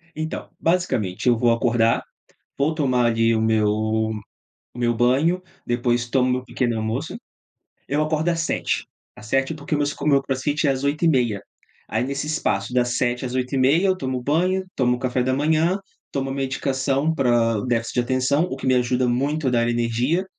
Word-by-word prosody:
Então, 155 +1 -5
basicamente 130 - 0
eu 120 - +5
vou 120 +1 +3
acordar, 115 -1 +2 0.6
vou 150 +3 +1
tomar, 130 -6 +2
ali, 115 0 +2
o 110 - +1
meu 110 -1 +2
o 110 0 -1 0.5
meu 120 -1 +2
banho. 140 +10 +2 0.3
Depois 120 0 0
tomo 130 -1 +2
meu 125 0 -1
pequeno 120 -3 -1
almoço. 110 +1 -3 0.7
Eu 145 +2 0
acordo 155 +2 0
às 165 -1 0
7h. 165 - -1 0.3
Às - - -13
7h 135 +5 +1
porque 150 0 -3
meus 145 0 0
meu 140 -2 +4
crossfit 140 +3 -1
é - - +4
às 135 0 -3
8h30. 135 - +1 0.5
Aí 110 +2 0
nesse 140 +2 -3
espaço 110 -8 -1
das 125 -1 +1
7h 125 0 0
às 125 0 -4
8h30 130 +5 +2
eu 190 -1 +2
tomo 130 -6 -3
banho, 180 +6 +1
tomo 125 -1 +2
café 125 0 -1
da 130 - 0
manhã, 160 +6 +2 0.3
tomo 135 -1 -2
medicação 135 +2 0
pra 120 -6 +2
déficit 115 -1 -1
de - - +2
atenção, 130 +5 +1
o 155 - -3
que 135 - -7
me 130 - +4
ajuda 125 0 +1
muito 140 +5 0
a - - +4
dar 120 -1 +2
energia 120 +9 0
130 Hz, 175 wpm, -22 LUFS, 120-145 Hz, 0.7 s, eu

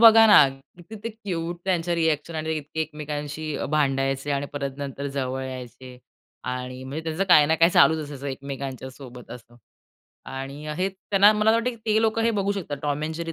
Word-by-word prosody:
बघा 225 -1 +9
ना, 150 -10 +8 0.3
किती 195 +6 -10
ते - - -1
क्यूट 175 -6 -5
त्यांच्या 175 -2 0
रिएक्शन 160 -1 0
आणि 160 0 -2
इतके 155 +1 -5
एकमेकांशी 150 0 -4
अ, - - -3
भांडायचे 135 -1 0
आणि 140 0 -1
परत 140 -2 -4
नंतर 140 0 -5
जवळ 130 0 -2
यायचे 130 0 -9 0.5
आणि 125 0 -5
म्हणजे 145 +5 -6
त्याचं 165 +4 -1
काही 155 -6 +6
ना 160 - +3
काही 165 +2 +5
चालूच 160 -2 +5
असायचं 145 -1 -8
एकमेकांच्या 135 -1 -5
सोबत 125 -2 -12
असं 120 0 -11 0.7
आणि 135 +3 -6
हे 185 +2 +1
त्यांना 195 +2 +4
मला 215 +1 +3
असं 225 - +4
वाटत, 230 +2 0
की 240 - -10
ते 220 0 +3
लोकं 225 0 +1
हे 230 - +3
बघू 200 -2 0
शकतात, 175 -8 -4
टॉम 145 0 -1
एंड 160 +1 -3
जेरी 165 0 -4
150 Hz, 195 wpm, -25 LUFS, 135-180 Hz, 0.7 s, बघा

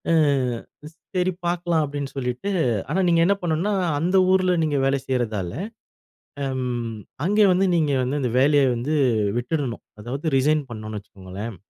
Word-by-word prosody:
ஆ - - +3 0.8
ஸ் - - -29 0.2
சரி 180 0 +2
பார்க்கலாம் 175 -1 +1
அப்டின்னு 140 -1 -5
சொல்லிட்டு 125 +9 -2 0.4
ஆனா, 175 +6 0
நீங்க 170 -1 +4
என்ன 200 - +4
பண்ணுனா 175 +4 0 0.3
அந்த 175 +5 0 0.2
ஊருல 185 -1 +3
நீங்க 150 -2 0
வேலை 135 0 +2
செய்றதால, 110 -8 -1 0.9
ஆம். 125 -3 -2 0.3
அங்கே 210 +3 +4
வந்து 185 +2 +3
நீங்க 155 -4 +2
வந்து 135 +4 -1
அந்த 125 -3 -1
வேலைய 145 +1 +4
வந்து 130 +7 -1 0.4
விட்டுடணும், 125 -1 -3 0.2
அதாவது 135 +7 -3
ரிசைன் 150 +3 +2
பண்ணோம்னு 110 -1 -6
வச்சுக்கோங்களேன். 100 +2 -8
140 Hz, 145 wpm, -23 LUFS, 120-170 Hz, 0.9 s, நீங்க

